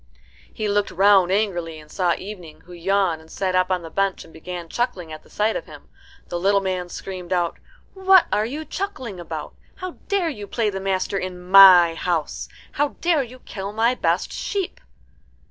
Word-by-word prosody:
He 215 - -3
looked 205 0 +1
round 195 -1 +4
angrily, 175 -6 -1
and 150 - -16
saw 180 -3 +1
Evening, 180 -6 -9
who 180 - -14
yawned, 175 -1 0
and 160 - -18
sat 185 +1 -2
up 185 0 +2
on 180 -2 0
the 165 - -9
bench, 195 -1 0
and - - -17
began 175 +1 -7
chuckling 180 -6 -3
at 155 - -9
the - - -22
sight 215 +1 0
of - - -4
him. - - -13 0.4
The 175 - -3
little 200 +2 +3
man 185 -2 -3
screamed 185 -1 -7
out, 175 -2 0 0.3
"What 380 -1 +5
are 210 0 +2
you 300 +6 -5
chuckling 270 - -5
about? 175 - -6 0.2
How 370 -1 -7
dare 390 -4 +1
you 210 -9 -7
play 215 0 0
the 195 - -4
master 190 0 -1
in 185 -1 -5
my 185 -4 +9
house? 165 -2 -2 0.2
How 290 0 -1
dare 335 -4 +2
you 255 0 -9
kill 195 -1 -6
my 230 +3 +2
best - - 0
sheep?" 395 -3 -3
195 Hz, 190 wpm, -22 LUFS, 175-220 Hz, 0.4 s, my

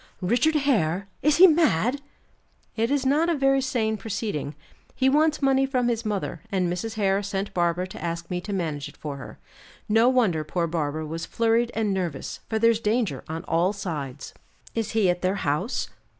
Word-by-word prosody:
"Richard 245 - +2
Hare! 200 - +1
Is 295 +1 +3
he 370 - +10
mad?" 285 - +3 0.7
"It 230 +1 0
is 280 -2 0
not 300 +5 +3
a 340 - +2
very 270 -1 +3
sane 235 -5 0
proceeding. 200 -9 -4 0.4
He 265 0 +3
wants 305 +1 +2
money 270 0 +3
from 250 -3 +1
his 230 -1 -1
mother, 200 -6 -3
and 185 -2 +1
Mrs. 220 +5 -4
Hare 200 -2 +1
sent 200 0 -3
Barbara 175 0 +1
to - - -9
ask 170 0 -3
me 180 0 -1
to 205 - -6
manage 160 -7 -3
it - - -17
for 145 -2 -6
her. 130 - -10 0.5
No 225 +3 +4
wonder 215 -12 +2
poor 170 +3 -1
Barbara 155 -2 -2
was 165 +2 -5
flurried 230 +1 +1
and 215 -3 0
nervous, 175 -7 -3
for 220 - 0
there's 230 0 +3
danger 215 - 0
on 160 +2 -4
all 175 +3 +1
sides." 155 -10 -5 0.4
"Is 225 -1 -2
he 220 -4 +3
at 175 0 +1
their 185 +2 +1
house?" 150 - -1
205 Hz, 185 wpm, -25 LUFS, 170-250 Hz, 0.7 s, he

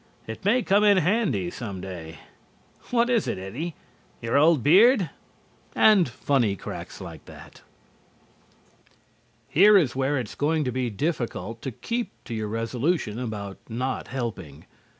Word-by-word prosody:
It 110 - -8
may 230 +6 +3
come 205 +1 +3
in 205 -2 +5
handy 180 - +1
some 100 -6 -6
day. 85 -4 -8 0.7
What 240 -1 +2
is 240 -4 +1
it, - - -2
Eddie? 125 - -5 0.4
Your 115 0 -2
old 150 -2 +4
beard?" 195 - +5 0.6
And 200 - +5
funny 120 -4 0
cracks - - -8
like - - -9
that. - - -14 1.9
Here 205 +5 +6
is 140 -10 +1
where 135 +2 0
it 125 -4 -3
is - - -10
going 155 +1 0
to 125 - -2
be 125 0 -1
difficult 115 - -3
to - - -4
keep 235 - -3 0.2
to - - -6
your 110 -1 -3
resolution 115 +3 -1
about 105 -5 -5
not 125 +3 -3
helping. 110 - -6
130 Hz, 145 wpm, -25 LUFS, 110-180 Hz, 1.9 s, Here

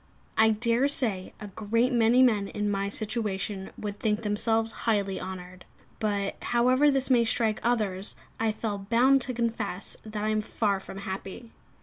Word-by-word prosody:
I 220 0 +5
dare 230 +4 +2
say 220 -10 +1
a 210 - -7
great 225 +5 0
many 240 +2 +5
men 210 -5 +3
in 210 0 -2
my 200 0 -1
situation 205 -3 -2
would 205 -1 -5
think 215 0 0
themselves 225 +2 +1 0.2
highly 200 -3 0
honoured; 180 -1 -8 0.4
but, 200 -2 -1
however 255 +4 +3
this 270 -1 0
may 240 -2 +5
strike 225 -2 +1
others, 210 -5 -1 0.2
I 225 -1 +2
fell 210 -1 -3
bound 260 +4 +5
to 255 +1 -3
confess 230 -5 -3
that 215 -1 -5
I 215 - 0
am 215 0 +1
far 210 -2 -1
from 195 - -10
happy. 195 +4 -7
215 Hz, 160 wpm, -27 LUFS, 200-235 Hz, 0.4 s, I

